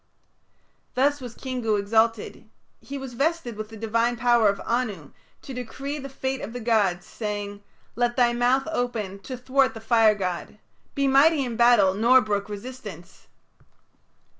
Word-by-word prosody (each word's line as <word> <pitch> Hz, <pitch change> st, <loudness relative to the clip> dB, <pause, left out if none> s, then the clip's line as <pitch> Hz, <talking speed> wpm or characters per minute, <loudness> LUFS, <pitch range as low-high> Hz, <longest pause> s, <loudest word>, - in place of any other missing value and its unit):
Thus 285 Hz, +2 st, +2 dB
was 245 Hz, -2 st, -8 dB
Kingu 250 Hz, -5 st, -2 dB
exalted; 220 Hz, +1 st, 0 dB, 0.3 s
he 280 Hz, -, -7 dB
was 265 Hz, -2 st, -7 dB
vested 280 Hz, -2 st, -1 dB
with 215 Hz, 0 st, -6 dB
the 225 Hz, -, -10 dB
divine 230 Hz, +2 st, 0 dB
power 235 Hz, -2 st, +4 dB
of 200 Hz, -, -2 dB
Anu 220 Hz, -, -2 dB, 0.3 s
to 270 Hz, -, -8 dB
decree 270 Hz, +4 st, -5 dB
the 275 Hz, 0 st, -7 dB
fate 265 Hz, 0 st, -3 dB
of 225 Hz, -, -6 dB
the 245 Hz, -, -5 dB
gods, 205 Hz, -6 st, +1 dB
saying, 205 Hz, -2 st, -5 dB, 0.3 s
"Let 240 Hz, 0 st, 0 dB
thy 240 Hz, -2 st, +3 dB
mouth 250 Hz, +3 st, +2 dB
open 225 Hz, -9 st, -3 dB
to 255 Hz, +6 st, -7 dB
thwart 260 Hz, +1 st, +1 dB
the -, -, -6 dB
fire 225 Hz, -1 st, +4 dB
god; 185 Hz, +1 st, -4 dB, 0.4 s
be 275 Hz, -1 st, +1 dB
mighty 280 Hz, +2 st, +4 dB
in 240 Hz, -2 st, -4 dB
battle 235 Hz, -5 st, +5 dB
nor 235 Hz, +6 st, +5 dB
brook 205 Hz, -3 st, -2 dB
resistance." 205 Hz, -5 st, -9 dB
235 Hz, 155 wpm, -25 LUFS, 210-260 Hz, 0.4 s, battle